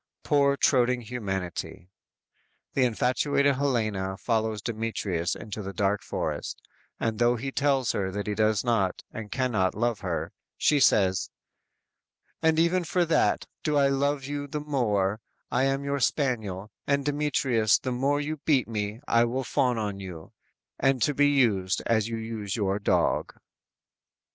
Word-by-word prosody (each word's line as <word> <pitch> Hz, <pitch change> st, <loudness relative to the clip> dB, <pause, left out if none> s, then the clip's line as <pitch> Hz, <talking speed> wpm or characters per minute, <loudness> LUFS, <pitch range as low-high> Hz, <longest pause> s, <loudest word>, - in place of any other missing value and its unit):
Poor, 140 Hz, -1 st, +3 dB
toadying 125 Hz, -3 st, +3 dB
humanity! 95 Hz, -6 st, -5 dB, 0.8 s
The 130 Hz, -, +3 dB
infatuated 135 Hz, +4 st, +1 dB
Helena 110 Hz, -9 st, -1 dB
follows 110 Hz, -1 st, -1 dB
Demetrius 110 Hz, -7 st, -2 dB
into 105 Hz, 0 st, -6 dB
the 100 Hz, -1 st, -6 dB
dark 100 Hz, +2 st, 0 dB
forest, -, -, -4 dB, 0.4 s
and 110 Hz, 0 st, -1 dB
though 120 Hz, 0 st, +4 dB
he 135 Hz, +4 st, -4 dB
tells 135 Hz, -3 st, +1 dB
her 95 Hz, -1 st, -1 dB
that 100 Hz, +2 st, -4 dB
he 105 Hz, -, -1 dB
does 110 Hz, -1 st, +2 dB
not 110 Hz, -7 st, 0 dB
and 110 Hz, -2 st, -7 dB
cannot 115 Hz, -8 st, 0 dB
love 120 Hz, 0 st, 0 dB
her, 90 Hz, -4 st, -3 dB, 0.2 s
she 150 Hz, -, +3 dB
says: 95 Hz, -7 st, +3 dB, 1.1 s
_"And 160 Hz, 0 st, +3 dB
even 170 Hz, +2 st, +3 dB
for 175 Hz, +1 st, +1 dB
that, 165 Hz, -, +2 dB, 0.2 s
do 150 Hz, -1 st, 0 dB
I 140 Hz, -1 st, +4 dB
love 140 Hz, +1 st, 0 dB
you 145 Hz, 0 st, -4 dB
the 150 Hz, +2 st, -4 dB
more; 110 Hz, -8 st, 0 dB, 0.3 s
I 130 Hz, +2 st, +2 dB
am 135 Hz, +1 st, 0 dB
your 140 Hz, 0 st, -1 dB
spaniel; 110 Hz, -9 st, -1 dB, 0.2 s
and 140 Hz, -1 st, +1 dB
Demetrius 140 Hz, -6 st, +2 dB
The 130 Hz, -, -4 dB
more 135 Hz, +4 st, +1 dB
you 155 Hz, +2 st, -3 dB
beat 140 Hz, -3 st, +1 dB
me, 105 Hz, 0 st, -3 dB
I 115 Hz, 0 st, +4 dB
will 130 Hz, +3 st, -2 dB
fawn 125 Hz, 0 st, +1 dB
on 105 Hz, -3 st, -3 dB
you, 90 Hz, -4 st, -9 dB, 0.5 s
And 135 Hz, -1 st, +2 dB
to 145 Hz, -, +2 dB
be 145 Hz, +1 st, +4 dB
used, 105 Hz, -10 st, +2 dB
as 110 Hz, -2 st, +2 dB
you 115 Hz, -1 st, -3 dB
use 110 Hz, -3 st, -4 dB
your 100 Hz, -3 st, 0 dB
dog!" 100 Hz, -, +1 dB
120 Hz, 155 wpm, -27 LUFS, 105-140 Hz, 1.1 s, though